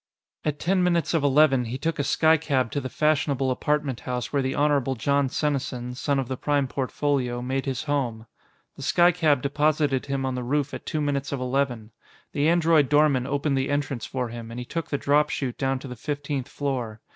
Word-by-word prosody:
At 150 -1 -1
ten 185 +4 +1
minutes 175 -2 +1
of 160 -3 +1
eleven, 140 -2 +4
he 120 +3 -4
took 160 +3 -2
a - - +2
skycab 145 -5 +2
to 145 - -2
the 130 - -5
fashionable 140 -3 +1
apartment 145 -1 -1
house 125 +1 -4
where 140 - +2
the 130 0 -2
Honorable 140 -3 +2
Jon 140 +3 +1
Senesin, 130 -4 -2
son 140 +2 0
of 135 -2 -1
the 130 0 -4
Prime 145 -1 +1
Portfolio, 130 -2 -1
made 135 +2 -2
his 130 0 -2
home. 130 -7 -2 0.5
The - - -9
skycab 165 -6 +3
deposited 145 -1 +1
him 135 -1 -1
on 130 - -1
the 125 - -3
roof 140 +3 -1
at - - -7
two 155 - -1
minutes 140 -1 -1
of 140 - -2
eleven. 125 -4 -1 0.4
The 145 +2 +2
android 165 -4 +4
doorman 145 -4 +3
opened 140 0 0
the 130 - -1
entrance 140 -4 -2
for 125 -2 -3
him, 115 0 -8
and 115 +1 -6
he 125 - -5
took 165 +5 -4
the 145 - 0
drop 150 +2 +2
chute 130 -4 -3
down 135 -1 0
to 130 - -9
the 125 - -7
fifteenth 145 +1 -3
floor. 130 -7 -3
140 Hz, 205 wpm, -25 LUFS, 130-150 Hz, 0.5 s, eleven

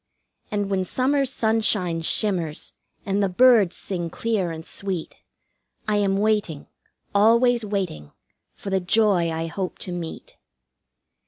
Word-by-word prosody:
And 205 -1 -2
when 190 -1 +1
summer's 265 +6 +1
sunshine 215 -8 +1
shimmers, 170 -3 -1 0.3
and 200 +1 0
the 200 - +1
birds 215 -2 +4
sing 175 -3 -4
clear 210 -1 -1
and 160 0 -7
sweet, 190 -4 -5 0.7
I 210 -1 +2
am 195 -1 +1
waiting, 205 -8 0 0.5
always 235 +3 +4
waiting, 190 - -4 0.4
for 195 - -7
the 190 - +2
joy 190 -2 +2
I 165 0 -3
hope 185 +3 -4
to 180 - -6
meet. 170 -2 -7
195 Hz, 130 wpm, -23 LUFS, 175-215 Hz, 0.7 s, birds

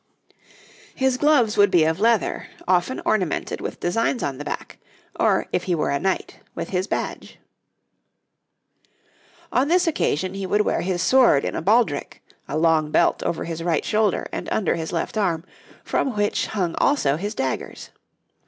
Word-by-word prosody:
His 265 -1 +1
gloves 260 -6 +3
would 205 -1 +6
be 175 -4 +4
of 160 +2 0
leather, 230 0 +1 0.2
often 180 +7 +1
ornamented 185 -7 -1
with - - -5
designs 225 +7 0
on 135 -1 -3
the - - -5
back, - - -6 0.4
or, - - +2
if - - 0
he 180 - +1
were 150 - -1
a 140 - 0
knight, 190 +3 -2 0.2
with - - -5
his 185 +1 -1
badge. - - -4 2.1
On 255 +3 +2
this 360 +3 +3
occasion 185 - 0
he 195 -1 -4
would 210 +3 +2
wear - - 0
his 180 -1 -1
sword 250 - +4
in - - -2
a - - -2
baldric, 200 -5 +1 0.2
a 150 - -3
long 160 -1 +2
belt 170 - +2
over 165 - -2
his 165 -1 -5
right 165 -2 0
shoulder 215 -2 +1
and - - -5
under 200 -6 +1
his 160 -1 -4
left 175 +5 -2
arm, 170 -4 0 0.4
from 260 -5 -1
which 205 0 0
hung 180 -6 -2
also 275 - +2
his 205 +7 -4
daggers. 130 -7 -4
185 Hz, 165 wpm, -23 LUFS, 165-220 Hz, 2.1 s, would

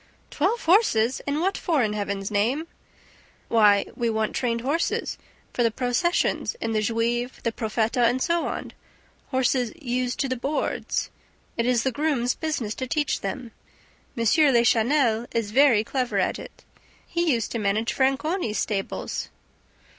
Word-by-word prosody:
"Twelve 395 +10 0
horses! 295 - +3
And 290 +2 0
what 385 +3 +1
for, 310 -7 +1
in 210 -1 0
Heaven's 200 -1 -3
name?" 235 +10 +1 0.8
"Why, 210 -3 +5
we 235 -2 0
want 220 -1 -1
trained 235 -2 0
horses 290 +7 -1 0.3
for - - -1
the 230 - +4
processions 250 - 0
in 225 - -2
the 215 -1 +1
Juive, 235 +3 -1
The 230 - 0
Profeta 225 +2 0
and 255 - -1
so 340 +3 0
on; - - -5 0.6
horses 260 -2 +1
'used 250 -3 -2
to 275 - 0
the 255 - -1
boards.' 275 +5 -2 0.4
It 235 +1 0
is 245 -2 +2
the 265 - +1
grooms' 255 -2 0
business 285 -10 -3
to 260 - -2
teach 295 +1 -1
them. 230 +4 -5 0.7
M. 230 - 0
Lachenel 240 -2 +3
is 230 -3 -1
very 250 -4 +5
clever 255 +1 -2
at - - 0
it. - - -12 0.4
He 340 -1 0
used 230 -4 -1
to 235 - -2
manage 210 +2 0
Franconi's 270 - 0
stables." 195 -2 -3
245 Hz, 150 wpm, -25 LUFS, 225-285 Hz, 0.8 s, Why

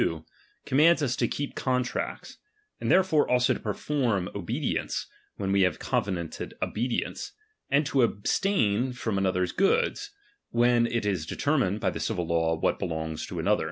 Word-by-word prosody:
2) 80 -1 -1 0.4
commands 155 +4 +4
us 130 -3 +1
to 120 - +1
keep 145 +4 -4
contracts; 125 -1 -2 0.4
and - - -2
therefore 185 -5 +4
also 125 0 +3
to - - -5
perform 110 -3 -1
obedience, 95 -4 -2 0.3
when 95 -1 -2
we 100 0 +3
have 90 -1 +2
covenanted 85 -5 -3
obedience, 120 +3 -2 0.4
and 145 +2 +3
to 135 -2 +2
abstain 120 - +1
from 110 -5 -2
another's 90 -1 +1
goods, 465 - +1 0.4
when 120 0 +3
it 115 -2 -1
is 90 -6 -1
determined 125 - 0
by - - 0
the - - -5
civil 95 -6 -1
law 80 0 +1
what 80 - 0
belongs 80 -2 -3
to - - -6
another. - - +2
115 Hz, 155 wpm, -27 LUFS, 90-130 Hz, 0.4 s, commands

